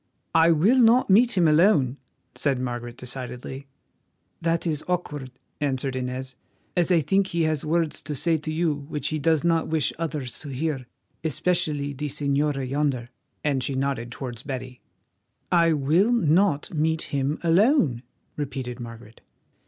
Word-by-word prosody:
"I 165 +1 +6
will 195 +12 +4
not 235 -2 +5
meet 230 +2 +5
him 170 -3 +5
alone," 150 - +4 0.4
said 135 -3 0
Margaret 120 -1 -4
decidedly. 125 +2 -6 0.7
"That 165 +1 0
is 155 -3 -1
awkward," 150 -7 -3 0.3
answered 135 -2 -1
Inez, 130 0 -4 0.4
"as 175 0 +2
I 170 -2 +5
think 195 +5 +2
he 170 -3 0
has 155 -2 0
words 165 0 0
to 150 - -5
say 165 +4 +1
to 155 +1 -5
you 160 0 +1
which 145 0 -4
he 155 - -2
does 160 0 +2
not 165 -1 +2
wish 160 -2 0
others 150 -7 -4
to 145 - -8
hear, 135 -1 -3 0.4
especially 150 -2 0
the 150 +2 -4
señora 140 -1 0
yonder," 135 -3 -1 0.3
and 140 -3 +1
she 135 - -1
nodded 130 -3 -2
towards 125 -3 -6
Betty. 130 -2 -6 0.7
"I 170 -2 +4
will 155 - +3
not 175 -7 +2
meet 160 +1 +1
him 140 +2 0
alone," 170 - +3 0.3
repeated 130 -4 -4
Margaret. 115 -1 -10
150 Hz, 150 wpm, -25 LUFS, 130-165 Hz, 0.7 s, I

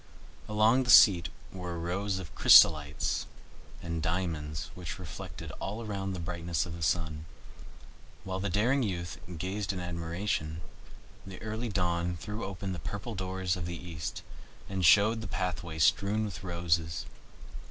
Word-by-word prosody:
Along 110 +4 +4
the 125 - -3
seat 90 -8 +8 0.2
were 90 -2 -5
rows 95 +4 -2
of 85 -8 -8
chrysolites 75 -2 +5 0.6
and 85 -1 -3
diamonds 80 -4 -2
which 85 -3 -6
reflected 90 -6 -8
all 110 +4 -4
around 95 -2 -3
the 90 - -5
brightness 85 -1 -2
of 85 - -7
the 85 - -8
sun. 80 -1 -1 1.0
While 95 0 -4
the 100 +1 -1
daring 120 +9 +2
youth, 85 -6 -3 0.2
gazed 95 +5 -2
in 95 - -4
admiration, 85 -2 -3 0.6
the 95 -1 -9
early 110 +2 -3
Dawn 90 -3 0
threw 105 +6 -6
open 95 0 -5
the 90 - -5
purple 100 +6 -5
doors 95 -1 -2
of 85 -2 -4
the 85 -1 -4
east, 80 -2 -6 0.4
and 95 -1 -3
showed 105 +7 +6
the 110 - -5
pathway 90 -4 -3
strewn 100 +7 +3
with 100 -2 -7
roses. 85 -2 -1
90 Hz, 145 wpm, -30 LUFS, 85-100 Hz, 1.0 s, seat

